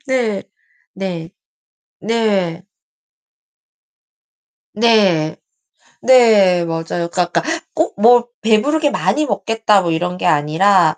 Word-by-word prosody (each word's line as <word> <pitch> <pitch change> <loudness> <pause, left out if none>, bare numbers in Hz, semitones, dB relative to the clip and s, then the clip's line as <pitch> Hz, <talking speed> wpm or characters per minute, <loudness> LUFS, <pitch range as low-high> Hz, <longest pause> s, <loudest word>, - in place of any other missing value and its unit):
네. 240 -7 -1 0.5
네. 175 -3 -6 0.7
네. 195 -6 -2 2.1
네. 200 -9 +2 0.7
네. 210 -9 +4
맞아요. 165 +1 -4
그러니까 180 - -1
약간 175 - -2 0.3
꼭 320 +2 -1
뭐 240 +2 +4
'배부르게 285 +8 +1
많이 305 +1 -1
먹겠다.' 210 -1 0
뭐 170 -2 -2
이런 180 +2 -3
게 - - -5
아니라 160 +3 +2
195 Hz, 175 characters per minute, -17 LUFS, 175-230 Hz, 2.1 s, 네